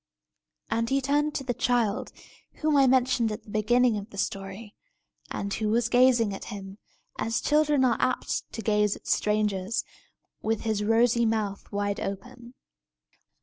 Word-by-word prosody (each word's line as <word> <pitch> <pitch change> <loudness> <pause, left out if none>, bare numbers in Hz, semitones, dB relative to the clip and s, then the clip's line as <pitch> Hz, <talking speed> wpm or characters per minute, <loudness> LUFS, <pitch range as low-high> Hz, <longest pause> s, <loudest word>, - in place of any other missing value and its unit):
And 230 0 0
he 270 +1 +2
turned 290 +2 0
to 275 - -2
the 250 -2 -2
child, 235 -4 0 0.4
whom 310 -1 0
I 275 -1 +5
mentioned 255 -3 +2
at 210 - -6
the 210 - -13
beginning 235 +2 +2
of 200 +2 -10
the 200 - -12
story, 195 +2 -4 0.6
and 200 0 -3
who 215 -1 -1
was 225 +1 +1
gazing 245 -4 +4
at 195 - -7
him, 195 0 -8 0.4
as 225 0 0
children 300 -3 +3
are 240 -3 +2
apt 255 - -1
to 225 - -5
gaze 210 -1 +2
at - - -15
strangers, 210 -1 0 0.6
with 225 -1 -1
his 215 -2 -1
rosy 230 +2 +3
mouth 210 -3 -2
wide 205 0 -1
open. 240 +5 -7
225 Hz, 155 wpm, -27 LUFS, 205-250 Hz, 0.6 s, I